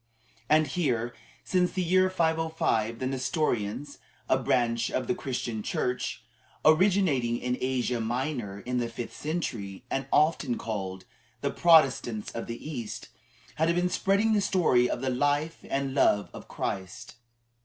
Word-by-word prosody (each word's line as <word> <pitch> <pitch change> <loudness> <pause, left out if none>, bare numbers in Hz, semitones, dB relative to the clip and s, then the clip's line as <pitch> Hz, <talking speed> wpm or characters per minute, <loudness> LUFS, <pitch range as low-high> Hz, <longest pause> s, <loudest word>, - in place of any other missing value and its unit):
And 155 +1 +5
here, 125 -7 -1 0.3
since 180 -1 +1
the 185 - 0
year 185 +2 +3
505, 160 -10 0
the 130 - -3
Nestorians, 130 -1 -2 0.3
a - - +4
branch 120 -3 +1
of 130 - -1
the - - +1
Christian 125 -9 -3
Church, 125 +4 -2 0.4
originating 155 -8 +4
in 125 0 -1
Asia 125 -2 0
Minor 120 -4 -3
in 125 +4 -2
the 120 -1 -1
fifth 115 0 -7
century, 120 - -4
and 135 0 -1
often 150 -5 +2
called 95 -4 -5 0.4
"the - - 0
Protestants 135 -10 +3
of 115 - -5
the 115 +5 -6
East," 120 -8 -6 0.5
had 165 +2 +2
been 180 0 +1
spreading 200 +4 +2
the 210 - +3
story 155 -11 +3
of - - -2
the 130 -1 0
life 145 +5 0
and 135 -1 -1
love 105 -7 +3
of - - -10
Christ. 95 +4 -5
130 Hz, 145 wpm, -28 LUFS, 115-160 Hz, 0.5 s, And